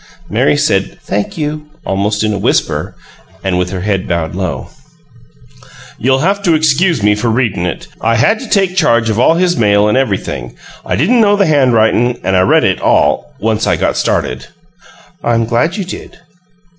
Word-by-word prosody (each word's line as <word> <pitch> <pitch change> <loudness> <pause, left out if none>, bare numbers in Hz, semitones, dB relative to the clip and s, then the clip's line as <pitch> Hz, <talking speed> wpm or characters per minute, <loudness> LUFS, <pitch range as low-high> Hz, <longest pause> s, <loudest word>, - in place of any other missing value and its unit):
Mary 125 +7 +2
said, 100 -10 0
"Thank 105 - -3
you," 150 0 -4 0.2
almost 105 +2 -1
in 105 -1 0
a 100 - -3
whisper, - - -1 0.5
and 95 -2 0
with 90 0 -1
her 95 -1 -5
head 100 0 -1
bowed 85 -2 -2
low. 95 0 -4 1.3
"You'll 135 +5 +1
have 200 +1 0
to 175 -5 +2
excuse 155 - +2
me 105 0 +4
for 105 +3 -1
readin' 110 -7 0
it. 85 - -5 0.2
I 115 +1 +2
had 170 - +2
to 255 - -9
take 195 -3 +1
charge 115 -9 +2
of 110 - -1
all 160 +6 +4
his 175 0 +1
mail 105 -4 +3
and 105 - +1
everything; 100 - -2 0.3
I - - -2
didn't 230 - +2
know 205 -1 +4
the 200 -1 +2
handwritin', 120 -4 +2
and 95 +1 0
I 90 - +4
read 95 - +3
it - - 0
all - - +1
once 110 0 -1
I - - +2
got - - -1
started." - - -2 0.8
"I'm 115 -1 +1
glad 120 - 0
you 200 - -2
did." 180 - -9
115 Hz, 180 wpm, -14 LUFS, 100-155 Hz, 1.3 s, me